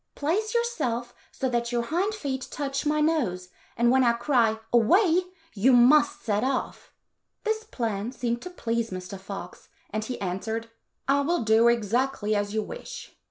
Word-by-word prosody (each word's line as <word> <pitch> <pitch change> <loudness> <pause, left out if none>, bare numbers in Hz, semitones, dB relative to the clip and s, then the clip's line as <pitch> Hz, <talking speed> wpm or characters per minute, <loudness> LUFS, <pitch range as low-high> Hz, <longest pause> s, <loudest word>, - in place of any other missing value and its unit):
"Place 420 +10 -1
yourself 255 - -1 0.2
so 265 - -2
that 235 -1 -1
your 240 -1 0
hind 365 - -1
feet 270 -9 -4
touch 275 0 -3
my 305 0 +2
nose, 235 - 0 0.3
and 235 +1 +4
when 260 0 +4
I 235 -1 +4
cry, 235 -2 +2
' 225 - -26
Away! 335 - +5 0.2
' 325 0 -32
you 260 +1 +6
must 290 +5 +5
set 210 -1 0
off." 260 0 -2 0.5
This 440 -1 -1
plan 230 - -3
seemed 240 -2 -2
to 360 - -7
please 235 -9 -2
Mr. 185 +1 -7
Fox, 190 -2 -9 0.2
and 215 +1 -2
he 250 +3 -5
answered, 220 +5 -3 0.2
" - - -50
I 280 +1 +3
will 335 0 0
do 220 +1 +5
exactly 235 0 +1
as 205 0 -1
you 215 0 -1
wish." - - -9
245 Hz, 175 wpm, -26 LUFS, 225-300 Hz, 0.5 s, you